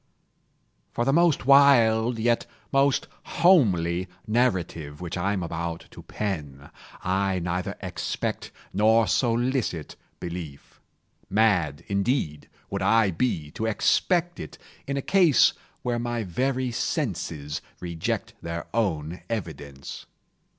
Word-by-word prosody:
For 120 - 0
the 135 - +2
most 170 -5 +3
wild, 120 -4 +5
yet 120 +1 +1 0.2
most 135 0 +3 0.2
homely 95 - +3 0.2
narrative 90 -10 0
which 90 -2 -5
I 95 +3 0
am 95 -3 -2
about 85 0 -4
to - - -11
pen, 75 -9 -5 0.3
I 95 +1 +1
neither 90 +1 -2
expect - - -3 0.2
nor 110 +3 +4
solicit 120 - 0 0.2
belief. 85 -5 -8 0.5
Mad 90 -9 +2
indeed 100 - -1 0.2
would - - -2
I 115 -3 +4
be 80 -6 -1
to 110 - -3
expect 175 - +1
it, - - -8 0.3
in 140 0 -2
a 140 - -2
case 175 - +5 0.3
where 120 -1 -1
my 120 -1 -2
very 130 +6 -1
senses 95 - -3 0.2
reject 85 -2 -3
their 85 0 -5
own 85 -7 -1
evidence. 70 -10 -6
105 Hz, 115 wpm, -26 LUFS, 85-125 Hz, 0.5 s, wild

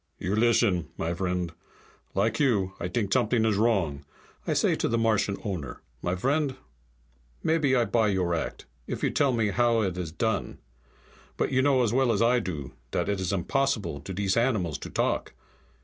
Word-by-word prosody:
"You 95 +3 -2
listen, 110 -7 +3
my 85 +1 -1
vriend. 90 -1 -2 0.6
Like 105 +3 +1
you, 105 -10 +2
I 85 - -2
t'ink 100 +1 -1
something 120 -2 +2
is 110 -2 +2
wrong. 95 -10 +1 0.4
I - - +2
say - - +2
to - - 0
Martian 110 -3 +1
owner, 90 -10 -5 0.2
'My 90 - -1
vriend, 135 - 0 0.9
maybe 155 -5 +2
I 120 -2 +3
buy 110 0 +2
your 95 -4 +1
act, 80 - -3 0.2
if - - -4
you - - +2
tell 140 -2 +2
me 115 -4 +1
how 120 0 +3
it 90 -2 -2
is 85 -3 -4
done. 110 +2 -2 0.8
But - - 0
you 130 - +3
know 135 -2 +3
as 115 -1 0
well 130 -1 +3
as 105 - +1
I 120 +1 +4
do 75 - -5 0.2
dat - - -1
it 100 -1 0
is 95 -1 -1
impossible 100 - 0
to - - -7
dese 95 +2 0
animals 110 - +1
to - - -7
talk. - - -1
105 Hz, 180 wpm, -27 LUFS, 90-120 Hz, 0.9 s, I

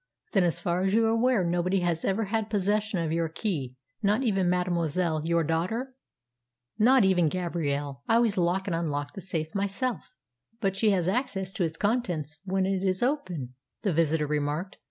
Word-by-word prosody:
"Then, 195 -4 +3
as 170 - +1
far 175 +1 0
as 190 +2 +1
you 225 0 +4
are - - +3
aware, 230 -2 +3
nobody 175 +2 +1
has 170 -2 0
ever 195 +3 +1
had 220 +1 -1
possession 210 0 0
of 165 -2 -1
your 165 0 0
key 155 - -3 0.3
not 210 +6 +2
even 195 -6 +2
mademoiselle 175 -2 0
your 170 0 +2
daughter?" 185 - -1 0.9
"Not 250 +2 +6
even 180 -4 +3
Gabrielle. 145 -6 -2
I 225 - +5
always 230 -3 +3
lock 180 +1 +1
and 185 - -1
unlock 145 -3 -2
the 195 - -7
safe 160 -3 -4
myself." 200 +5 -2 0.4
"But 195 -4 0
she 215 +2 +3
has 180 -4 +1
access 195 -3 -1
to 185 - -1
its 160 -1 -2
contents 175 - -1
when 190 0 +1
it 190 -1 0
is 190 +2 0
open," 180 - -2 0.3
the 200 -5 +1
visitor 160 -1 +2
remarked. 150 +5 -2
185 Hz, 180 wpm, -27 LUFS, 165-205 Hz, 0.9 s, Not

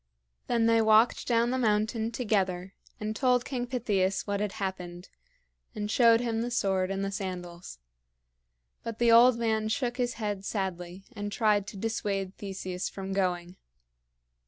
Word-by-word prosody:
Then 235 -2 +2
they 230 0 +4
walked 220 +2 +4
down 235 0 +2
the 260 - 0
mountain 220 0 +1
together 195 -6 -1 0.3
and 215 +1 -3
told 250 +1 +2
King 245 -2 -3
Pittheus 205 -7 0
what 200 -1 -2
had 210 -1 -2
happened, 185 -3 -5 0.7
and 210 0 -3
showed 230 -1 +5
him 230 -2 -1
the 240 - -2
sword 190 -5 0
and 195 0 -2
the 195 - -3
sandals. 180 - -6 1.0
But 230 -1 -6
the 235 0 +4
old 235 +1 +7
man 220 -2 0
shook 245 +1 -1
his 245 -1 -1
head 205 -3 -3
sadly 190 -2 -4
and 205 0 -4
tried 205 -2 +2
to 195 - -8
dissuade 195 -3 -2
Theseus 190 -2 -4
from 195 0 -6
going. 180 -2 -1
210 Hz, 155 wpm, -28 LUFS, 190-230 Hz, 1.0 s, old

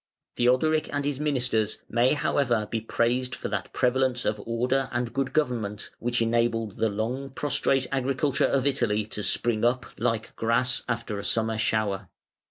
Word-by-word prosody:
Theodoric 150 +6 +2
and 145 -1 -1
his 145 -2 -1
ministers 125 -7 0
may 120 +4 +3
however 120 -6 +1
be 115 +1 -2
praised 125 +3 0
for - - -5
that 100 -2 -3
prevalence 125 0 +1
of 105 -1 0
order 125 +3 0
and 120 -1 -2
good 135 -1 -1
government, 115 -8 -1
which 120 0 +1
enabled 115 -2 0
the 115 - +2
long 120 +7 -3
prostrate 135 -1 +1
agriculture 135 +1 +1
of 135 -1 +1
Italy 115 -7 +1
to 105 0 -6
spring 110 +1 +1
up 125 +2 +2
like 115 -1 -1
grass 120 +2 +2
after 115 -3 -2
a - - -6
summer 110 -1 0
shower. 105 -4 0
120 Hz, 160 wpm, -26 LUFS, 110-130 Hz, -, may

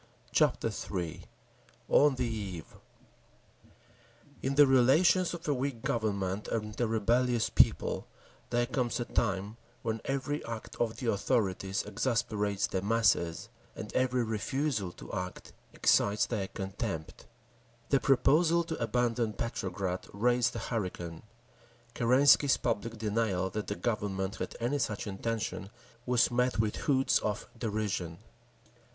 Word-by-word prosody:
Chapter - - +2 0.2
III 85 -4 -4 0.6
On 145 -2 +5
the 130 - -1
Eve 100 -8 -5 1.7
In 135 +1 -1
the 145 +1 +8
relations 155 +8 +4
of 170 - -9
a 145 - +3
weak 130 -3 -3
Government 100 -3 -1
and 105 0 -3
a 120 - +2
rebellious 115 +2 +1
people - - +2 0.4
there 120 0 +2
comes 125 -1 -1
a 120 - -1
time 100 -1 -1 0.3
when 110 -1 -2
every 140 +2 -2
act 115 -1 -6
of 115 -1 -1
the 120 -4 0
authorities 95 -2 0
exasperates 105 -3 0
the 95 - -2
masses, 100 -6 +1 0.3
and - - -7
every 125 -1 +2
refusal 115 -1 -1
to - - -11
act 90 0 -5 0.2
excites 100 +1 +3
their 105 -5 -2
contempt…. 95 -4 -5 0.6
The 140 - +4
proposal 155 +6 +4
to 160 -5 -5
abandon 115 -1 0
Petrograd 95 -5 -3
raised 120 +3 +2
a - - -2
hurricane; 90 -6 -3 0.7
Kerensky's 130 +4 +5
public 115 +2 -2
denial 105 -4 0
that 105 +2 -4
the 100 - -2
Government 100 -4 -2
had - - -5
any 125 +5 0
such 105 -5 -2
intention 105 0 -3 0.4
was 125 -1 +3
met 125 +1 +1
with 110 -1 0
hoots 135 -2 +3
of 105 -1 -3
derision. 100 -7 -2
115 Hz, 125 wpm, -31 LUFS, 100-125 Hz, 1.7 s, the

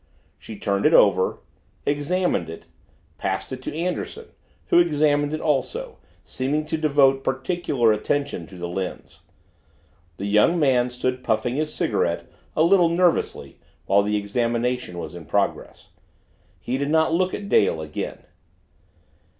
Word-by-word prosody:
She 110 - -9
turned 100 +5 +1
it 160 - +4
over, 95 -2 +4 0.5
examined 145 - 0
it, 80 - -9 0.5
passed 95 +6 -3
it 130 -1 -6
to 130 - -6
Anderson, 180 - -3 0.4
who - - +6
examined 150 -3 +2
it 155 - -2
also, 445 - -2 0.2
seeming 145 +4 -2
to 155 - -2
devote 140 -3 +3
particular 130 -4 +1
attention 140 - -2
to 95 - -12
the 85 0 -4
lens. 90 +1 -6 1.0
The 100 - -5
young 105 +12 +3
man 125 -4 +3
stood 125 +1 -3
puffing 120 +1 0
his 155 0 -1
cigarette - - -1 0.3
a 155 - +3
little 175 0 +5
nervously 175 0 0 0.3
while 100 +1 +4
the 105 +1 0
examination 115 0 -1
was 85 - -6
in 85 -2 -9
progress. - - -2 0.7
He 130 +2 -3
did 140 0 -1
not 160 +1 +3
look 185 +2 +1
at 205 - -7
Dale 80 - +3
again. 75 -1 -6
135 Hz, 140 wpm, -23 LUFS, 105-160 Hz, 1.0 s, who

